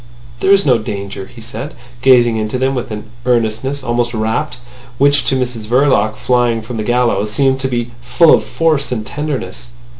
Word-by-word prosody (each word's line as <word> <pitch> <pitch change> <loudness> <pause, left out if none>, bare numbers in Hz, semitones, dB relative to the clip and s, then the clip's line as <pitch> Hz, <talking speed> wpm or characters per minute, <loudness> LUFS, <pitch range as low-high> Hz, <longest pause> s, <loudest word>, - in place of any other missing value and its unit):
"There 190 - 0
is 200 0 +5
no 125 -5 +4
danger," 100 -2 -6
he 120 - -14
said, 115 +6 -7 0.3
gazing 120 -3 +5
into 110 +2 -2
them 130 +1 0
with 125 -2 -4
an 105 -1 -5 0.2
earnestness 125 +3 0
almost 120 -1 -1
rapt, 110 +5 -2 0.4
which 140 +1 +3
to - - +1
Mrs 120 -4 -3
Verloc, 120 -4 +2
flying 120 -2 +1
from 115 +1 -6
the 110 - -2
gallows, 120 -3 +1
seemed 135 +2 +2
to 135 - -1
be 120 -2 -3
full 125 +7 +4
of - - +3
force 155 -5 0
and 110 -4 -3
tenderness. 145 0 -5
120 Hz, 180 wpm, -16 LUFS, 110-135 Hz, 0.4 s, is